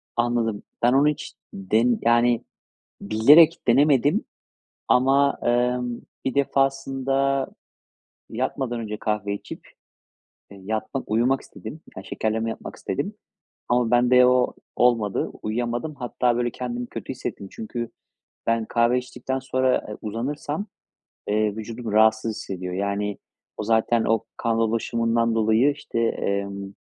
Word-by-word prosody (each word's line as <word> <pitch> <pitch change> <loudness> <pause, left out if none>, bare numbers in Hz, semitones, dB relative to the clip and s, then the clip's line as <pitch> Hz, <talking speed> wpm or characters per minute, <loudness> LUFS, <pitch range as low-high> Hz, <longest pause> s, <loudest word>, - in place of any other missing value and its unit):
Anladım. 120 -3 0 0.2
Ben 120 +1 +4
onu 140 +2 +5
hiç 150 +2 -2 0.2
den 110 +5 +1
yani, 120 0 +3 0.6
bilerek 145 +11 +6
denemedim. 145 - +4 0.6
Ama, 135 +2 +4
emm, 120 0 0 0.2
1 130 - -1
defasında 135 0 +1 0.8
yatmadan 125 0 -2
önce 105 -1 -4
kahve 105 -2 -1
içip, 100 - -9 0.8
eee, 100 -1 -12
yatmak 110 +5 -4
uyumak 125 +5 +2
istedim. 155 - -10 0.2
Ya, 95 - -6
şekerleme 110 +2 -2
yapmak 110 - -7
istedim. - - -3 0.6
Ama 120 -1 +2
bende 125 +1 +5
o 125 0 +3 0.2
olmadı. 115 -5 +2
Uyuyamadım. 120 +6 -2
Hatta, 125 -2 0
böyle, 120 0 0
kendimi 125 0 -4
kötü 115 -4 -8
hissettim. 110 -5 -6
Çünkü 120 +1 -5 0.6
ben 115 -1 +1
kahve 115 +2 +2
içtikten 125 +1 -4
sonra, 130 -1 +1
eee, 105 - -7
uzanırsam, 145 - -3 0.6
eee, 105 0 +1
vücudum 110 +1 -6
rahatsız 110 +1 +3
hissediyor. 90 -1 -5
Yani, 100 +1 -2 0.4
o - - -3
zaten 115 +1 +2
o 115 0 +1
kan 115 -1 0
dolaşımından 115 +1 +1
dolayı, 110 +5 +3
işte, 140 -5 -5
emm, 100 -3 -2
120 Hz, 120 wpm, -24 LUFS, 110-130 Hz, 0.8 s, bilerek